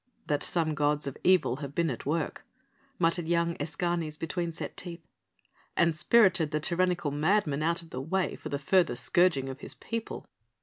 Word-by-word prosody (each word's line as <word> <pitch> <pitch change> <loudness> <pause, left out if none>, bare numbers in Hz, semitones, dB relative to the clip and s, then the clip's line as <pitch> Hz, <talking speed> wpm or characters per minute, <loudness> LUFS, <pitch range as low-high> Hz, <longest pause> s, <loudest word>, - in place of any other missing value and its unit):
"That 145 -1 0
some 160 -3 +1
gods 150 0 +1
of 140 - -4
evil 180 -9 +3
have 140 -1 -7
been 170 -3 +1
at 125 - -7
work," 160 +1 -2 0.5
muttered 165 -1 +1
young 170 0 +1
Escanes 160 +1 -2
between 170 +1 -3
set 165 - -6
teeth, 170 -2 -7 0.7
"and 170 -2 +3
spirited 180 -2 +4
the 150 - -1
tyrannical 175 -1 +1
madman 155 0 +1
out 170 +2 0
of 165 - -17
the 130 - -4
way 185 +6 -1
for - - -8
the 140 - -1
further 175 +6 +2
scourging 175 -7 +2
of 135 0 -7
his - - -5
people." 230 -1 -5
165 Hz, 175 wpm, -29 LUFS, 150-175 Hz, 0.7 s, spirited